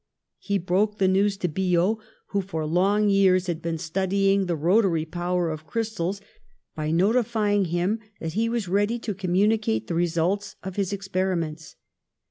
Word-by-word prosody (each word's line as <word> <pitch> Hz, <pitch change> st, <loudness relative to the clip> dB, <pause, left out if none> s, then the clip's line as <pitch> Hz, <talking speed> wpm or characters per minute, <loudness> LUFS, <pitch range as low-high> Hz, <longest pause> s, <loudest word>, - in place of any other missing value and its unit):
He 200 Hz, -1 st, -1 dB
broke 195 Hz, +4 st, 0 dB
the 190 Hz, -, +3 dB
news 195 Hz, +1 st, +2 dB
to 180 Hz, -, -1 dB
Biot, 180 Hz, +4 st, +1 dB, 0.3 s
who 200 Hz, -, 0 dB
for 165 Hz, -5 st, -4 dB
long 195 Hz, +6 st, +2 dB
years 190 Hz, -2 st, +4 dB
had 170 Hz, -3 st, -3 dB
been 165 Hz, -1 st, -2 dB
studying 195 Hz, +4 st, +1 dB
the 175 Hz, -, 0 dB
rotary 170 Hz, 0 st, +2 dB
power 175 Hz, 0 st, -1 dB
of 155 Hz, 0 st, -7 dB
crystals, 205 Hz, -4 st, -2 dB, 0.5 s
by 155 Hz, -1 st, -2 dB
notifying 205 Hz, +2 st, +2 dB
him 175 Hz, +6 st, 0 dB, 0.2 s
that 160 Hz, -1 st, -4 dB
he 225 Hz, +3 st, +1 dB
v/as 230 Hz, -4 st, -2 dB
ready 205 Hz, +5 st, +1 dB
to 225 Hz, -2 st, -4 dB
communi 200 Hz, +4 st, +1 dB
cate 110 Hz, -, -1 dB
the -, -, -4 dB
results 175 Hz, +4 st, 0 dB
of 190 Hz, -1 st, -6 dB
his 200 Hz, -2 st, -1 dB
experiments. 185 Hz, -5 st, -2 dB
190 Hz, 160 wpm, -25 LUFS, 170-205 Hz, 0.5 s, years